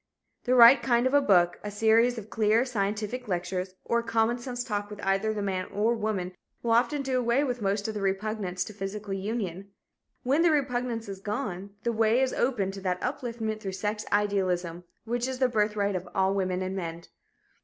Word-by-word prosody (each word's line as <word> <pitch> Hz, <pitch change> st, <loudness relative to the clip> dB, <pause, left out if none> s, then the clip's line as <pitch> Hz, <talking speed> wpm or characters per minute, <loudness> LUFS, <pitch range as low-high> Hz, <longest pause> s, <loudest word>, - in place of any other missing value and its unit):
The 255 Hz, 0 st, +3 dB
right 245 Hz, +2 st, +9 dB
kind 240 Hz, -1 st, +2 dB
of 260 Hz, -, +1 dB
a 285 Hz, -, +6 dB
book, 175 Hz, -8 st, +3 dB
a 210 Hz, -, -4 dB
series 225 Hz, +4 st, +3 dB
of 215 Hz, -1 st, -8 dB
clear, 220 Hz, +2 st, +3 dB
scientific 220 Hz, +1 st, -2 dB
lectures, 180 Hz, 0 st, -3 dB
or 235 Hz, -, +2 dB
a -, -, -4 dB
common 230 Hz, +1 st, +1 dB
sense 245 Hz, 0 st, -4 dB
talk 205 Hz, -4 st, -3 dB
with 210 Hz, -1 st, -9 dB
either 195 Hz, +3 st, +1 dB
the 210 Hz, -1 st, -3 dB
man 185 Hz, -2 st, -1 dB
or 215 Hz, +4 st, +1 dB
woman 210 Hz, -5 st, -2 dB, 0.3 s
will 235 Hz, -, 0 dB
often 265 Hz, +5 st, +2 dB
do 260 Hz, -1 st, 0 dB
away 240 Hz, +3 st, +2 dB
with 250 Hz, -4 st, -2 dB
most 200 Hz, +1 st, 0 dB
of 220 Hz, -, -3 dB
the 210 Hz, -, -4 dB
repugnance 195 Hz, -1 st, -1 dB
to 215 Hz, -, -9 dB
physical 200 Hz, 0 st, -5 dB
union. 195 Hz, -2 st, -4 dB, 0.5 s
When 275 Hz, +6 st, +2 dB
the 340 Hz, -, +5 dB
repugnance 250 Hz, -6 st, -1 dB
is 195 Hz, -1 st, -6 dB
gone, 200 Hz, -1 st, -4 dB
the 235 Hz, -, +1 dB
way 225 Hz, +2 st, +3 dB
is 265 Hz, -1 st, +1 dB
open 225 Hz, -7 st, 0 dB
to 195 Hz, 0 st, -8 dB
that 180 Hz, -1 st, -1 dB
upliftment 230 Hz, -4 st, -3 dB
through 195 Hz, -3 st, -5 dB
sex 210 Hz, +2 st, -2 dB
idealism 185 Hz, -4 st, 0 dB, 0.2 s
which 240 Hz, +2 st, -1 dB
is 260 Hz, -1 st, -3 dB
the 255 Hz, 0 st, +3 dB
birthright 210 Hz, -3 st, 0 dB
of 180 Hz, 0 st, -4 dB
all 190 Hz, 0 st, +2 dB
women 185 Hz, -1 st, -1 dB
and 185 Hz, +1 st, -3 dB
men. 170 Hz, -2 st, -5 dB
210 Hz, 200 wpm, -28 LUFS, 195-240 Hz, 0.5 s, right